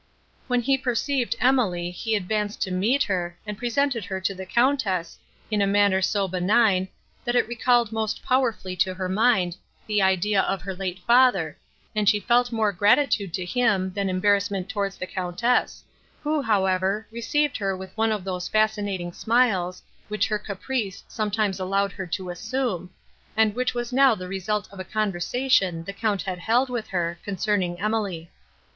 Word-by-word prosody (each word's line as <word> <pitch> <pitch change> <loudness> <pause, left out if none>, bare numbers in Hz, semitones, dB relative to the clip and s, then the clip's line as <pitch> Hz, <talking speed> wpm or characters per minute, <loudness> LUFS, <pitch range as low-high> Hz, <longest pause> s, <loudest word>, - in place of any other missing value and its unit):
When 245 -1 +1
he 270 +2 +2
perceived 255 +1 0
Emily, 210 -9 +2
he 220 +5 -2
advanced 210 +1 -2
to 190 - -4
meet 220 +10 +2
her, 175 -3 -2
and 210 -1 -4
presented 245 +1 0
her 190 +1 -4
to 190 +1 0
the 190 0 -8
Countess, 230 -8 +1 0.3
in 210 -1 +1
a 200 - +3
manner 200 -1 +3
so 195 0 +1
benign, 190 +1 +2 0.4
that 240 -1 -1
it 245 - +3
recalled 240 -1 +2
most 220 -1 -2
powerfully 245 -8 0
to 185 +1 +1
her 185 0 -3
mind 190 -3 +2 0.3
the 210 -1 +1
idea 190 +1 +3
of 195 0 -2
her 190 0 -4
late 185 -1 -4
father, 235 -10 +4 0.4
and 210 -1 +3
she 210 - +3
felt 245 +3 +2
more 220 -2 +1
gratitude 205 0 +2
to 185 - -3
him, 190 -2 +1
than 200 -1 -1
embarrassment 200 0 +1
towards 200 -2 -2
the - - -4
Countess, 185 +7 -1 0.4
who, 300 0 +1
however, 195 -2 +1
received 285 +5 0
her 195 -2 -1
with 190 0 -10
one 225 0 +1
of 210 -3 -2
those 180 -1 -3
fascinating 205 -5 0
smiles, 200 -7 +1 0.2
which 210 +1 0
her 210 -1 0
caprice 205 0 -4
sometimes 210 -3 -1
allowed 195 +1 0
her 190 0 -6
to 180 +1 -4
assume, 185 -2 -3 0.5
and 220 -1 +4
which 250 +2 -1
was 240 +1 -3
now 270 -2 +5
the 185 -2 -7
result 205 +2 -2
of 195 - -11
a - - -3
conversation 195 -1 0
the 200 - -6
Count 205 -1 -1
had 185 -2 -4
held 245 +8 +1
with 240 -3 -3
her, 175 -2 -2
concerning 190 -3 -1
Emily. 200 -6 -2
205 Hz, 170 wpm, -25 LUFS, 185-235 Hz, 0.5 s, now